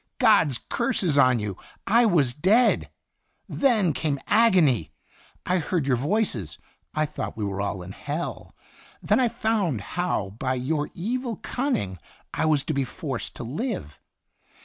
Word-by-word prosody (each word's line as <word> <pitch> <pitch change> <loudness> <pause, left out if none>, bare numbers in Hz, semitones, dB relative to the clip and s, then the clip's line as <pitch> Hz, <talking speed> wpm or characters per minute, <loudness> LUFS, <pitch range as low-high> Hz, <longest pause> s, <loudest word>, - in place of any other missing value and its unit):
God's 210 - +4
curses 205 - -1
on 130 -3 +5
you! 105 -4 -4 0.3
I 235 +3 +4
was 145 - +3
dead. 200 - +3 0.6
Then 220 - +2
came 145 -1 -1
agony. 185 - +4 0.6
I 180 +1 +1
heard 165 -1 -1
your 135 -2 +2
voices. 140 - -1 0.4
I 155 0 +2
thought 150 - -5
we 105 - -2
were 100 0 -3
all 100 -2 -3
in 90 - -8
hell. 150 +10 -5 0.5
Then - - +3
I 250 - +4
found 220 - 0
how 175 - -1
by 130 -1 0
your 145 +4 -1
evil 235 +5 -2
cunning 220 - -2 0.3
I - - 0
was 150 -3 +3
to 155 - -2
be 140 -1 +1
forced 135 -2 -5
to - - -6
live. 125 - -4
155 Hz, 150 wpm, -25 LUFS, -, 0.6 s, on